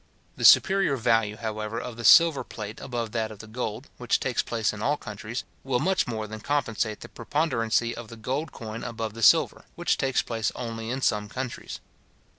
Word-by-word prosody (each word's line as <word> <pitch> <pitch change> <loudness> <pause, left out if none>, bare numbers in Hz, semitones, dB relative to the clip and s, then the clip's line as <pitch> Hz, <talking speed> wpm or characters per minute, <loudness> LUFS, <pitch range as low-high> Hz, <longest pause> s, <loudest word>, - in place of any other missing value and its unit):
The - - -1
superior 190 -7 +6
value, 115 -3 +2
however, 110 0 -4
of 125 -1 -6
the 115 - -8
silver 165 +2 +7
plate 105 0 -8
above 120 -3 -4
that 110 -1 -1
of 110 - -10
the 110 - -10
gold, 110 +2 -5
which 125 -1 +1
takes 125 -3 0
place 115 -2 -1
in 105 - -7
all 145 +6 +1
countries, 110 +1 -6 0.2
will 135 -2 0
much 185 +1 +1
more 110 -3 -3
than 110 +1 -7
compensate 115 -5 -1
the - - -8
preponderancy 115 -6 0
of 120 -1 -8
the 115 - -11
gold 135 +7 -3
coin 110 0 -7
above 115 -2 -4
the 115 - -8
silver, 105 - +4
which - - 0
takes 130 -2 +1
place 115 -2 -2
only 115 -1 -5
in 130 +2 -2
some 105 -2 +1
countries. 130 +1 -5
115 Hz, 195 wpm, -26 LUFS, 110-130 Hz, 0.2 s, silver